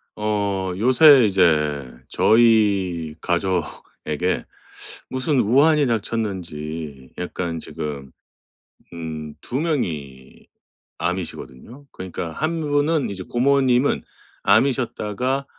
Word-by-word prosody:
어 100 -3 -1
요새 130 +4 +7
이제 75 -8 +2 0.2
저희 100 -8 +3
가족에게 90 -1 -2 0.6
무슨 130 +1 0
우한이 145 +6 +4
닥쳤는지 85 - -4
약간 90 -2 -4
지금 70 -4 -6 0.8
음 80 -2 -6
2 130 - -3
명이 75 - -4 0.5
암이시거든요. 90 - -5
그러니까 90 -2 -6
한 160 - -2
분은 145 0 +1
이제 95 -1 -6
고모님은 130 +2 +2 0.4
암이셨다가 125 +2 +1
100 Hz, 195 characters per minute, -22 LUFS, 80-130 Hz, 0.8 s, 요새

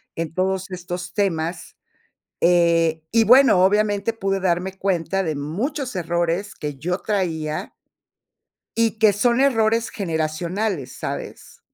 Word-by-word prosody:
en 165 -1 -4
todos 190 +1 -1
estos 180 0 -6
temas, 170 -4 -2 0.6
eh, 170 -2 +3
y 225 0 +4
bueno, 250 -5 +6
obviamente 205 +2 +2
pude 195 -2 -1
darme 185 +1 -1
cuenta 195 0 0
de 160 -4 -2
muchos 240 - -3
errores 175 +3 -1
que 150 -2 -5
yo 180 +5 -1
traía 160 -7 -2 1.0
y 225 -1 +1
que 215 -2 +5
son 235 +4 +2
errores 230 -4 +2
generacionales, 165 - -2
¿sabes? - - -7
185 Hz, 120 wpm, -22 LUFS, 165-215 Hz, 1.0 s, bueno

